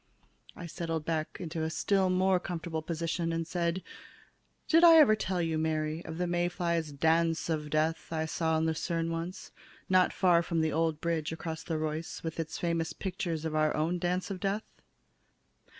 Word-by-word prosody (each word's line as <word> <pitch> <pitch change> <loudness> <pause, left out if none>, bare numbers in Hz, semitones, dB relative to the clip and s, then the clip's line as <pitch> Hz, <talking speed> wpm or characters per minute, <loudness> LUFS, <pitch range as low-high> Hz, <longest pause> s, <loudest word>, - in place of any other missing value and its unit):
I 175 - -7
settled 165 -1 -4
back 160 -2 -2
into 165 -2 -4
a 160 - 0
still 190 +3 +1
more 185 0 +3
comfortable 170 -3 -4
position 165 +1 -2
and 165 0 -1
said: 170 +1 -1 0.8
"Did 330 +1 +5
I 335 -1 +10
ever 275 -9 +7
tell 185 -4 -1
you, 160 -1 0
Mary, 155 +1 -1
of 160 0 -6
the 180 - 0
May 175 0 0
flies' 170 -3 -1
dance 165 +3 +1
of 150 -2 -2
death 155 +2 0
I 160 -1 -1
saw 160 0 0
in 160 - +1
Lucerne 165 +1 -1
once, 165 +3 -5 0.4
not 185 -1 +4
far 175 -3 +4
from 165 -1 -1
the 160 -1 0
old 160 -1 0
bridge 160 -2 -1
across 160 0 -5
the 160 - -3
Reuss 155 +1 -4
with 165 0 -4
its 160 -1 -3
famous 165 -1 -1
pictures 175 -5 -3
of 160 - -2
our 155 0 +2
own 165 +4 0
dance 180 +3 -1
of 190 - -4
death? 200 +3 -1
165 Hz, 180 wpm, -30 LUFS, 160-175 Hz, 0.8 s, I